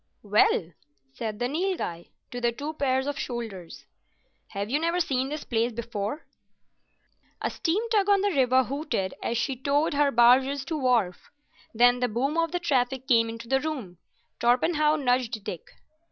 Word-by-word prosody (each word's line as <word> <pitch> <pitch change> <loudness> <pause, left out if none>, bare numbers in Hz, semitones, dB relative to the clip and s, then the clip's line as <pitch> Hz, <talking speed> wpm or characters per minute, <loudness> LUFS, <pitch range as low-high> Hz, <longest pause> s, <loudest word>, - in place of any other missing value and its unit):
"Well," 200 -4 +2 0.4
said 215 +5 -4
the 245 +2 -1
Nilghai 305 - -3 0.2
to 245 - -5
the 240 0 +2
two 290 +6 -5
pairs 265 -3 0
of 290 0 -3
shoulders, 220 -8 -6 0.6
"have 200 0 -4
you 275 +7 0
never 335 +2 0
seen 265 -6 0
this 300 0 -5
place 235 0 0
before?" 230 +4 -4 1.1
A - - -2
steam 395 +7 -1
tug 410 -3 +2
on 400 -1 +4
the 405 0 +1
river 260 -4 +3
hooted 255 - -3
as 235 - -1
she 260 +3 -1
towed 285 +5 0
her 285 0 +3
barges 260 +3 +4
to 320 - -3
wharf. 245 -10 0 0.4
Then 245 +2 +4
the 250 - +1
boom 255 +7 -1
of 330 0 +1
the 355 - 0
traffic 265 -5 0
came 230 -4 +4
into 230 +1 -8
the 265 +2 +1
room. 255 - -5 0.4
Torpenhow 300 +6 +3
nudged 250 -5 0
Dick. 195 -6 -6
255 Hz, 165 wpm, -26 LUFS, 230-295 Hz, 1.1 s, on